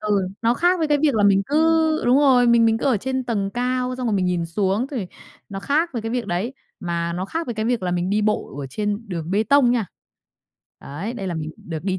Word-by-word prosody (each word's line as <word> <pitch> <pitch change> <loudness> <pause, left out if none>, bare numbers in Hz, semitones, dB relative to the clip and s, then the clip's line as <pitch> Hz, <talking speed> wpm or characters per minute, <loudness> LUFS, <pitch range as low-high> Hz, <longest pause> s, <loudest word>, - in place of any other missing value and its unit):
Ừ, 205 -3 0
nó 230 +2 +3
khác 355 +4 +2
với 315 -2 0
cái 295 -1 +3
việc 290 -5 +3
là 210 -2 +2
mình 195 -1 +4
cứ 290 - -1 0.5
đúng 250 +3 +4
rồi, 255 -4 +5
mình 235 -1 +5
mình 225 0 +3
cứ - - -5
ở 255 -5 +3
trên 260 +4 -3
tầng 200 -5 -2
cao 250 +2 -1
xong 250 -1 -3
rồi 215 - +1
mình 185 - 0
nhìn 175 -2 -1
xuống, 195 +7 0
thì 230 -10 -3 0.4
nó 195 -1 -6
khác 315 - 0
với 230 -3 -4
cái 225 - -4
việc 240 -3 -2
đấy, 195 +9 -2 0.3
mà 170 -1 -2
nó 180 +2 -3
khác 330 +10 -4
với 240 - -4
cái 220 - -2
việc 235 -3 0
là 180 - -1
mình 175 +1 -1
đi 210 +1 +1
bộ 210 -9 -1
ở 135 - -5
trên 205 - -3
đường 170 -2 -5
bê 205 +3 +2
tông 280 -2 +4
nha. 235 -5 0 0.9
Đấy, 170 +12 -6
đây 195 -6 -5
là 175 - -3
mình 155 -1 -4
được 165 -2 -6
đi 190 -1 -1
215 Hz, 260 wpm, -22 LUFS, 185-250 Hz, 0.9 s, rồi